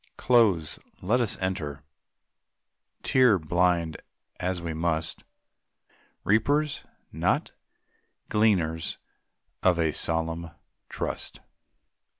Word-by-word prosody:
Close, 105 Hz, -11 st, +3 dB, 0.2 s
let 115 Hz, +7 st, +2 dB
us 115 Hz, -, 0 dB
enter, 75 Hz, -7 st, -3 dB, 1.2 s
tear 125 Hz, -6 st, +5 dB
blind 85 Hz, 0 st, +1 dB, 0.4 s
as 90 Hz, 0 st, -1 dB
we 85 Hz, -1 st, -4 dB
must; 80 Hz, 0 st, -1 dB, 1.0 s
Reapers, 145 Hz, +8 st, +2 dB, 0.3 s
not -, -, 0 dB, 0.8 s
gleaners 90 Hz, -7 st, +1 dB, 0.6 s
of 90 Hz, -2 st, +4 dB
a 80 Hz, -2 st, +2 dB
solemn 80 Hz, +2 st, 0 dB, 0.4 s
trust. -, -, -5 dB
85 Hz, 80 wpm, -27 LUFS, 80-105 Hz, 1.2 s, tear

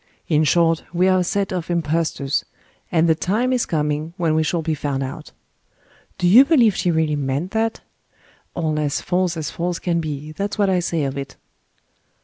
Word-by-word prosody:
In 155 Hz, -1 st, +2 dB
short, 165 Hz, +1 st, +2 dB
we 180 Hz, +2 st, +3 dB
are 185 Hz, 0 st, +4 dB
a -, -, +2 dB
set 195 Hz, +2 st, -1 dB
of 175 Hz, -2 st, -4 dB
impostors, 160 Hz, -4 st, -1 dB, 0.5 s
and 165 Hz, -1 st, +3 dB
the 160 Hz, -, +5 dB
time 215 Hz, +10 st, 0 dB
is 250 Hz, -, 0 dB
coming 150 Hz, +1 st, -2 dB
when 165 Hz, -3 st, +1 dB
we 160 Hz, -, +2 dB
shall 160 Hz, +1 st, -1 dB
be 160 Hz, -, -1 dB
found 140 Hz, -2 st, -2 dB
out." 130 Hz, -, -7 dB, 0.9 s
Do 180 Hz, -, +1 dB
you 230 Hz, +9 st, +8 dB
believe 255 Hz, -, +4 dB
she 180 Hz, -, 0 dB
really 160 Hz, -2 st, +1 dB
meant 140 Hz, +5 st, -2 dB
that? 225 Hz, 0 st, -1 dB, 0.7 s
All 155 Hz, -3 st, -1 dB
as 145 Hz, -2 st, -1 dB
false 180 Hz, -2 st, -1 dB
as 155 Hz, -2 st, -4 dB
false 175 Hz, 0 st, -2 dB
can 170 Hz, -2 st, -1 dB
be 150 Hz, -1 st, -5 dB
that's 200 Hz, +7 st, -4 dB
what 200 Hz, -2 st, +2 dB
I 185 Hz, -, +2 dB
say 170 Hz, -3 st, -1 dB
of 140 Hz, 0 st, -3 dB
it." 135 Hz, -1 st, -7 dB
165 Hz, 190 wpm, -21 LUFS, 150-185 Hz, 0.9 s, you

